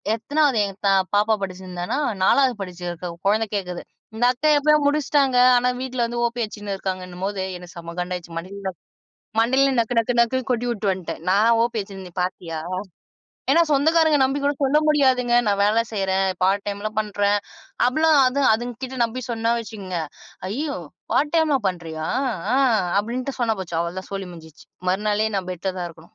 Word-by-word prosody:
எத்தனாவது? 285 0 +1
எங்க 195 -1 -7
த - - +5 0.3
பாப்பா 210 +2 +3
படிச்சு 190 -1 -5
இருந்தானா? 180 +8 -3 0.3
4வது 265 +3 +4
படிச்சுருக்க 175 -1 -5 0.2
கொழந்தை 215 +2 +3
கேக்குது. 180 -3 -3 0.3
"இந்த 240 +2 +1
அத்த 265 +5 -6
எப்பயோ 300 +1 +4
முடிச்சிட்டாங்க"ஆனா, 255 -4 +4
வீட்டுல 255 -2 -3
இருந்து 235 0 -2
ஓபி 240 +1 -2
அடிச்சின்னு 205 -2 -5
இருக்காங்கன்னும் 185 -1 -5
போது, 200 -1 -2 0.2
எனக்கு 180 +1 -13
செம 170 0 -7
கண்டாச்சி. 180 -1 -4
மண்டையில 190 +2 -5 0.7
மண்டையில 265 +4 +3
நக்கு 230 +1 -2
நக்கு 235 +2 +1
நக்குன்னு 255 +2 +1
கொட்டி 245 0 0
உட்டு 210 -2 -4
வந்த்ட்டேன். 185 -4 -6
"நான் 210 +4 +4
ஓபி 235 -1 -1
அடிச்சத 195 -1 -8
நீ 175 - -12
பாத்தியா?" 170 -3 -4 0.9
ஏன்னா, 335 - +6
சொந்தக்காரங்க 315 +1 +4
நம்பி 275 +2 0
கூடச் 285 0 0
சொல்ல 285 +3 +4
முடியாதுங்க. 260 -5 +3
"நான் 200 0 +1
வேலை 220 +3 +3
செய்யுறேன், 195 -1 +1 0.2
பார்ட் 195 +1 +2
டைம்லாம் 210 +2 -3
பண்றேன்" 205 -1 +1 0.5
அப்டிலாம் 310 +3 +4
அது 270 +3 +1
அதுங்ககிட்ட 245 +3 -5
நம்பி 250 +3 -4
சொன்னா 230 0 0
வச்சுக்குங்க, 195 -6 -5 0.5
"ஐயோ! 280 +7 -3 0.4
பார்ட் 295 +4 +1
டைம்லா 310 -4 +3
பண்றியா? 160 -3 -5 0.5
ஆ" - - +3 0.4
அப்படின்ட்டு 255 +5 -4
சொன்னா 225 -2 +2
போச்சு, 170 -3 -5
அவ்ளதான், 175 +2 -4
சோலி 195 -2 -4
முடிஞ்ச்சு. 160 -2 -14 0.2
மறுநாளே 210 +2 +1
நான் 185 -1 -3
பெட்ல 185 +1 -3
தான் 175 -1 -3
இருக்கணும். 165 0 -18
215 Hz, 160 wpm, -23 LUFS, 185-255 Hz, 0.9 s, ஏன்னா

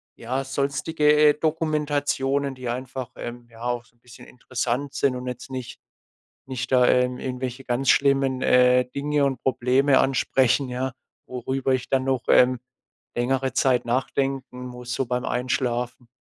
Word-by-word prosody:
ja, 130 +4 -3
sonstige, 140 +3 +1 0.2
äh, - - +4
Dokumentationen, 145 -3 0
die 130 -1 -6
einfach, 130 0 -5
ähm, 120 0 -7
ja 115 0 -13
auch 120 -1 -1
so 120 -1 -29
'n - - -36
bisschen 125 +1 -15
interessant 125 +2 -3
sind 135 -3 +1
und 125 - -6
jetzt 125 +1 -6
nicht 130 -2 -7 0.7
nicht 130 -1 -4
da, 125 -1 +5
ähm, 125 0 +2
irgendwelche 130 0 -5
ganz 130 +2 -1
schlimmen, 135 -2 +3
äh, 125 0 +5
Dinge 145 0 +1
und 135 -3 -1
Probleme 130 +2 +3
ansprechen, 135 0 +2
ja, 125 +1 -3 0.3
worüber 130 +2 -2
ich 130 -1 -1
dann 130 -1 +1
noch, 130 -2 0
ähm, 125 0 +5 0.6
längere 130 +2 0
Zeit 125 -3 +2
nachdenken 130 0 -2
muss 125 0 -7
so 130 0 -1
beim 125 +1 -2
Einschlafen. 125 0 -2
130 Hz, 150 wpm, -24 LUFS, 125-135 Hz, 0.7 s, da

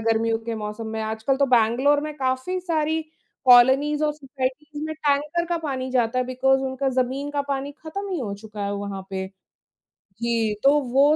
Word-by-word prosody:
गर्मियों 225 0 +1
के 230 - -2
मौसम 215 +1 -5
में। 220 0 -4
आजकल 220 +5 -1
तो 280 0 +3
बैंगलोर 250 +4 +3
में 305 +1 -4
काफ़ी 260 +7 -1
सारी 320 -2 0 0.4
कोलोनीज़ 265 +5 +6
और 300 - +1
सोसायटीज़ 290 +1 -5
में 315 0 -4
टैंकर 300 +3 0
का 345 0 0
पानी 265 -5 -3
जाता 250 -1 +1
है 255 - +1
बिकॉज़ 265 +1 +2
उनका 265 +1 -1
ज़मीन 270 +3 -2
का 285 -1 -1
पानी 280 +1 -2
खत्म 360 +7 -6
ही 360 - -1
हो 210 -6 -3
चुका 215 -2 -6
है 200 - -2
वहाँ 200 -1 -5
पे। 190 0 -3 1.0
जी, 230 -2 +1
तो 285 +2 +6
वो 280 +4 +5
265 Hz, 185 wpm, -24 LUFS, 230-295 Hz, 1.0 s, कोलोनीज़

